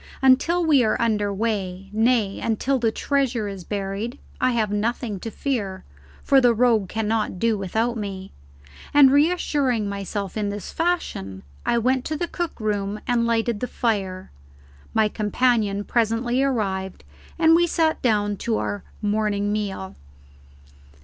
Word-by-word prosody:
Until 330 +7 +4
we 290 -5 +5
are 215 - +1
under 210 -3 +1
way, 195 -3 -3
nay, 220 -2 +2
until 255 +4 0
the 230 -2 +1
treasure 260 -5 0
is 195 -2 -6
buried, 205 +6 -4 0.2
I 255 - +3
have 220 -3 0
nothing 215 0 -2
to 225 - -5
fear, 215 -7 -3 0.4
for 275 -1 +5
the 240 -2 +4
rogue 225 -5 +3
cannot 220 -2 -1
do 230 +3 +1
without 220 +5 -1
me. 195 -2 -6 0.6
And, 280 -2 +8
reassuring 285 - +2
myself 200 -1 -4
in 210 -2 -1
this 200 -1 -6
fashion, 325 - -2 0.2
I 235 - +3
went 255 +2 +1
to 310 - -2
the 345 - -2
cook 345 -3 -4
room 205 -1 -2
and 235 -1 +2
lighted 230 -1 0
the 250 - -2
fire; 195 -7 -2 0.6
my 220 -1 +4
companion 210 -1 +1
presently 235 +3 +1
arrived, 195 -8 -1 0.3
and 325 0 +5
we 345 +1 +4
sat 320 -1 +1
down 205 -4 +1
to 225 +2 -1
our 205 - -3 0.2
morning 205 -1 0
meal. 195 -2 -3
220 Hz, 145 wpm, -23 LUFS, 205-250 Hz, 0.6 s, And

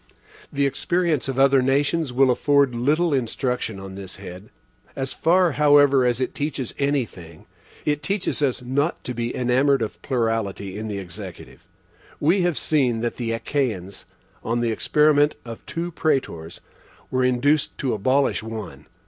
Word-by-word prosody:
The 140 0 +1
experience 170 +1 0
of 135 -1 -3
other 135 0 +5
nations 140 +3 +1
will 130 +1 +4
afford 140 0 +3
little 150 +7 +1
instruction 125 -4 -2
on 95 0 -8
this 95 -1 -8
head. 90 +4 -10 0.5
As 135 0 -1
far, 175 +1 +3
however, 145 -3 +5
as 120 0 0
it 130 - -2
teaches 140 -4 -3
any 140 -2 +1
thing, 85 -6 -14 0.4
it 150 -1 0
teaches 190 +2 -1
us 130 -3 0
not 140 +6 -1
to 125 - -4
be 120 0 -3
enamoured 130 +1 +2
of 110 - -6
plurality 115 -6 -2
in 110 +1 -5
the 105 -2 -4
Executive. 90 -3 -9 0.5
We 175 +6 +3
have 175 -5 +1
seen 125 -5 +1
that 120 0 -2
the 115 -2 -2
Achaeans, 115 -6 -3 0.4
on 120 +1 -1
an 115 - +1
experiment 150 +5 +3
of 115 -2 -8
two 170 +1 -4
Praetors, 105 - -2 0.5
were 130 0 +1
induced 135 +4 +1
to 130 - -1
abolish 130 +7 +1
one. 105 -10 -8
130 Hz, 155 wpm, -23 LUFS, 115-145 Hz, 0.5 s, other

